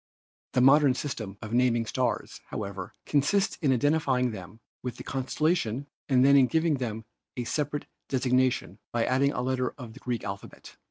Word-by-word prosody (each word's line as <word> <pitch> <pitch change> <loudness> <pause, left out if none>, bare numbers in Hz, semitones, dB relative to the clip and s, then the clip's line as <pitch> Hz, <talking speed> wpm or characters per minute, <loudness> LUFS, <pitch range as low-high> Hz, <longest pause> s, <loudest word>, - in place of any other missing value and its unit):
The 130 - +3
modern 135 0 +6
system 110 -8 -5
of 110 +1 -6
naming 120 -2 +3
stars, 125 +2 -2
however, 100 -3 -6
consists 150 +8 +2
in 145 -6 +1
identifying 130 -2 +2
them 95 +1 -9 0.2
with 125 -2 -5
the - - -8
constellation 135 -1 0 0.2
and 130 -1 +5
then 140 0 +7
in 135 -2 +6
giving 160 0 +2
them 110 -3 -4 0.3
a 125 - -1
separate 145 +3 -2 0.2
desig 130 -1 0
nation 130 0 +1
by 120 -1 +1
adding 135 +2 +2
a 125 - -2
letter 130 -1 0
of 120 -5 -9
the 130 - -12
Greek 125 -3 -3
alphabet. 100 0 -8
130 Hz, 170 wpm, -28 LUFS, 115-140 Hz, 0.3 s, then